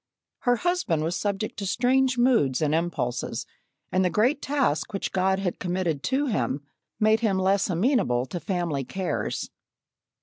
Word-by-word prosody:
Her 245 -1 +2
husband 245 - 0
was 165 +3 -1
subject 205 +4 -2
to 200 - -3
strange 255 +4 +2
moods 235 - +3
and 155 -1 +1
impulses, 160 -7 -2 0.5
and 185 - +2
the 180 - +2
great 245 +9 +2
task 265 - 0
which 195 - -2
God 190 0 +2
had 190 -3 -2
committed 175 -5 -1
to 270 +3 +1
him 140 - -1 0.4
made 215 +1 +4
him 210 -4 +1
less 195 +1 +2
amenable 175 - +2
to 175 +7 -5
family 175 -7 -2
cares. 185 +7 -3
190 Hz, 155 wpm, -26 LUFS, 165-240 Hz, 0.5 s, made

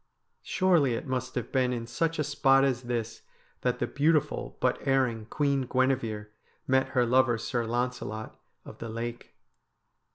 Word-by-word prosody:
Surely 170 -10 +2
it 135 - -5
must 130 -1 -3
have 120 -2 -3
been 130 -2 +2
in 120 -2 -3
such 165 +8 -1
a 150 - +1
spot 135 -2 +4
as 130 -3 +1
this 115 -2 -3 0.4
that - - 0
the - - 0
beautiful 150 0 0
but 125 - +1
erring 125 -5 +1
Queen 140 -2 0
Guinever 120 -5 0 0.4
met 130 0 +2
her 125 - +5
lover, 125 0 +3
Sir 115 +1 -2
Launcelot 120 -2 -3 0.3
of - - -11
the 115 - -6
Lake. 115 +1 -6
125 Hz, 155 wpm, -28 LUFS, 120-135 Hz, 0.4 s, her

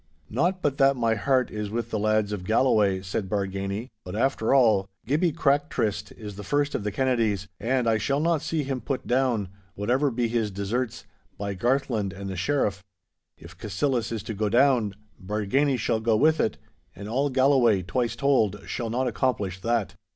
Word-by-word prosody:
'Not 175 - 0
but 140 -2 +1
that 135 0 +5
my 115 -3 +1
heart 130 +3 +1
is 105 -1 -4
with 115 +2 -3
the 110 - -1
lads 110 0 +1
of 100 -3 -4
Galloway,' 105 -3 +2
said 95 +1 -3
Bargany, 100 +3 -2
'but 90 +2 -7
after 115 -1 +1
all, 110 -8 +4 0.2
Gibby 155 +8 +2
Crack 145 -1 +1
tryst 100 -2 -2
is 105 -3 -9
the 105 - -7
first 145 +5 0
of - - -2
the 105 - -2
Kennedies, 110 -5 0
and 125 +1 0
I 110 -1 +3
shall 140 +4 0
not 165 0 +1
see 160 -1 -1
him 135 -2 -3
put 135 -2 -3
down, 120 -6 +1 0.3
whatever 125 +8 +1
be 120 -1 0
his 115 -2 0
deserts, 105 +5 -3 0.3
by 100 0 -3
Garthland 115 -2 0
and 100 +1 -6
the - - -5
Sheriff. 100 -1 0 0.5
If 85 +3 -13
Cassillis 115 - -1
is 110 -3 -3
to 110 - -5
go 105 +1 -1
down, 120 -4 +3 0.3
Bargany 110 +8 +1
shall 110 0 0
go 110 0 +2
with 155 +5 +3
it; - - 0 0.4
and 100 +3 -8
all 135 +6 0
Galloway, 130 -7 +3
twice 120 +5 -1
told, 110 -8 +2
shall 115 -2 -3
not 125 +3 0
accomplish 105 -7 -1
that! 115 -2 0
115 Hz, 185 wpm, -26 LUFS, 100-135 Hz, 0.5 s, that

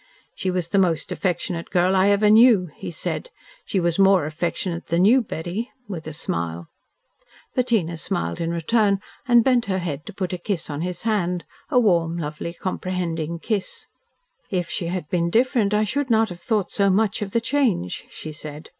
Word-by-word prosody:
"She 190 - -2
was 180 -2 -2
the 200 - +3
most 170 -5 +1
affectionate 175 -2 -2
girl 180 +1 +2
I 190 +1 +4
ever 205 +1 +4
knew," 215 -6 +6
he - - -6
said. 170 - -4 0.4
"She 195 - 0
was 170 0 0
more 195 -4 +5
affectionate 170 +2 -3
than 170 +3 +3
you, 250 +5 +6
Betty," 195 +3 -4 0.2
with 165 -6 -6
a - - -4
smile. 85 - -4 0.8
Bettina 225 -10 +1
smiled 85 - -3
in 165 - -1
return 200 +4 +2 0.3
and 240 -2 +6
bent 250 -2 +3
her 190 -1 0
head 155 -5 -4
to - - -7
put 185 -2 -3
a 180 - -3
kiss 175 -4 -3
on 145 +1 -4
his 180 0 -4
hand, 180 -6 0 0.2
a 260 -5 +4
warm, 170 -7 +2
lovely, 160 +2 -5
comprehending 170 -3 -3
kiss. 205 +3 -3 0.6
"If 180 -3 -2
she 170 - -2
had 175 -3 -3
been 170 0 0
different 230 0 +2
I 210 0 +3
should 260 +6 -1
not 225 -1 +3
have 175 -1 -9
thought 205 +1 0
so 200 -1 +2
much 205 +2 +2
of 200 -2 -3
the 230 - +2
change," 230 - 0
she 155 - -8
said. 150 0 -9
180 Hz, 185 wpm, -23 LUFS, 170-210 Hz, 0.8 s, knew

